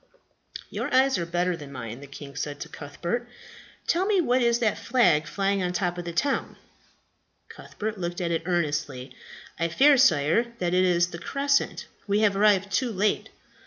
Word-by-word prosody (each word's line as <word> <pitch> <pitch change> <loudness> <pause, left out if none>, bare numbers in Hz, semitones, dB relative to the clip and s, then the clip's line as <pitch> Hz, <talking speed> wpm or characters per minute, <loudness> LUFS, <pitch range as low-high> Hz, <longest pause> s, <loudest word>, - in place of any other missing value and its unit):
"Your - - -3
eyes 265 -3 +3
are 170 - -3
better 175 +1 0
than 145 -3 -10
mine," 115 -2 -7
the 140 - -11
king 140 0 -10
said 145 0 -4
to - - -6
Cuthbert. 175 +11 -5 0.6
"Tell 365 +3 +1
me 415 -3 +3
what 255 -6 +2
is 235 -1 +3
that 225 -3 0
flag 180 -12 +2
flying 195 +4 0
on 180 - 0
the - - -4
top 180 -3 -1
of 175 - -6
the 170 - -4
town." 275 +11 -1 0.9
Cuthbert 215 -1 -6
looked 175 0 -3
at 170 -2 -1
it 165 - 0
earnestly. 145 -7 -2 0.4
"I 165 - +1
fear, 275 - +5
sire, 225 - +3
that 175 -3 -1
it 185 0 +4
is 175 -1 +2
the 170 - -7
crescent. 280 +5 0 0.2
We 205 +1 +2
have 205 -2 +3
arrived 200 -1 +3
too 240 +4 0
late." 210 +1 0
180 Hz, 185 wpm, -26 LUFS, 165-235 Hz, 0.9 s, fear